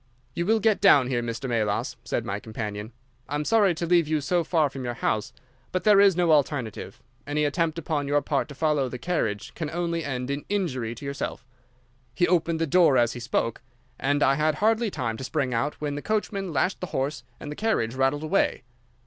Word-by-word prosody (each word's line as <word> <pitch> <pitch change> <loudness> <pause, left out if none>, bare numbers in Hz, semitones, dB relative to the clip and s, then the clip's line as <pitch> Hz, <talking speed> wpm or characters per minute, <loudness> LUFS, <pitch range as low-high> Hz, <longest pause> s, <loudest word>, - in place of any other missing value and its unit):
"'You 170 +1 -2
will 220 +1 +4
get 215 -2 +2
down 145 -10 +6
here, 120 -2 0
Mr. 120 +3 -4
Melas,' 110 -4 -1
said - - -2
my 100 - -3
companion. 105 0 -6 0.4
'I 145 - -2
am 150 0 -2
sorry 205 -4 +3
to 170 - -2
leave 170 -2 +3
you 155 0 +1
so 170 +4 +1
far 160 -2 +2
from 135 -1 -7
your 120 -1 -3
house, 110 -2 -1 0.4
but 185 - -1
there 210 -2 +6
is 200 -3 +5
no 175 -2 +2
alternative. 140 -7 0 0.3
Any 150 +1 0
attempt 160 +2 0
upon 150 -3 -2
your 145 +1 +2
part 140 -2 0
to 145 - -10
follow 150 -3 +1
the 125 - -6
carriage 120 - -2
can 155 -3 -4
only 170 0 -2
end 125 -2 -3
in 140 +1 -3
injury 130 - -1
to 140 - -9
yourself.' 140 -2 -4 0.7
"He 175 - +3
opened 170 -2 +1
the 165 - +1
door 165 -3 +4
as 120 -1 +3
he 125 - -7
spoke, 115 0 -1 0.4
and 145 +2 +1
I 135 - +5
had 155 +2 +1
hardly 220 +5 +2
time 120 - -3
to 130 - -7
spring 135 -2 -1
out 130 +6 -1
when 150 -1 -2
the 145 - -4
coachman 200 -2 -2
lashed 170 +6 0
the 180 - -3
horse 140 +3 -2 0.2
and 145 - -7
the - - -5
carriage 200 - 0
rattled 135 +3 +1
away. 180 -1 +1
145 Hz, 215 wpm, -26 LUFS, 130-175 Hz, 0.7 s, down